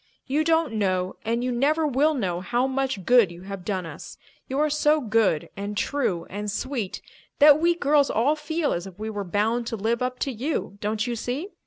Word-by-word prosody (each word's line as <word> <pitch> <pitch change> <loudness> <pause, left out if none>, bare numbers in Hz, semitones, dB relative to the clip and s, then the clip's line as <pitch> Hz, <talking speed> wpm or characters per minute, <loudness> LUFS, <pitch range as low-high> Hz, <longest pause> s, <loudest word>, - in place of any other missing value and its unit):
You 290 +4 +1
don't 320 -5 +2
know 185 -3 -1
and 230 +2 -1
you 250 - 0
never 295 +6 +2
will 295 +2 +2
know 180 -9 -1
how 240 +6 0
much 265 -7 -2
good 240 -7 +5
you 175 +1 -11
have 195 -1 -7
done 185 -2 -2
us. 160 -2 -9 0.3
You 265 - -2
are 305 +1 +3
so 300 +1 +3
good 215 - +1
and 205 +1 -5
true 210 -11 -1
and 205 +2 -5
sweet 225 -1 -3 0.3
that 295 0 +7
we 340 +1 +3
girls 290 -3 +3
all 270 +8 +2
feel 310 +1 -1
as 175 +2 -4
if 190 -1 -12
we 215 +1 -4
were 205 -1 -3
bound 220 +5 0
to 230 - -2
live 225 +3 -1
up 250 0 -1
to 275 - 0
you, 245 -4 -3
don't 215 +1 -1
you 240 -1 -2
see? 255 - -4
240 Hz, 210 wpm, -25 LUFS, 205-285 Hz, 0.3 s, that